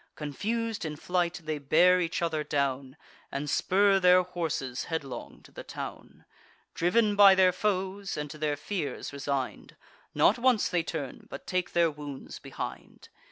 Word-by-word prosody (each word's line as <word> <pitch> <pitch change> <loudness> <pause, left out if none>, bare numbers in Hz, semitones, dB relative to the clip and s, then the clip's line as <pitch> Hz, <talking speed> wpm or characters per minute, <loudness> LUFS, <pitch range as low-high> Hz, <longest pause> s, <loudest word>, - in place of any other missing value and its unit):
Confus'd 220 - -3
in 155 -2 -4
flight, 175 +2 -1
they 155 -1 -3
bear 175 +6 +4
each 170 0 -2
other 160 -2 0
down, 140 -1 -2 0.3
And 140 +2 -3
spur 195 +6 +3
their 180 0 +6
horses 160 -8 -3
headlong 155 -5 -5
to - - -17
the - - -8
town. - - -8 0.5
Driv'n 205 +5 +2
by 200 -1 +8
their 185 -1 +5
foes, 195 0 -2
and 150 0 -3
to 155 - -10
their 150 -1 0
fears 145 -5 -4
resign'd, 140 -2 -4 0.4
Not - - +4
once 245 -3 +3
they 175 -1 +1
turn, 160 -5 -6
but - - -8
take 185 -1 -2
their 170 -2 +3
wounds 145 -2 -8
behind. - - -8
170 Hz, 155 wpm, -28 LUFS, 145-190 Hz, 0.5 s, by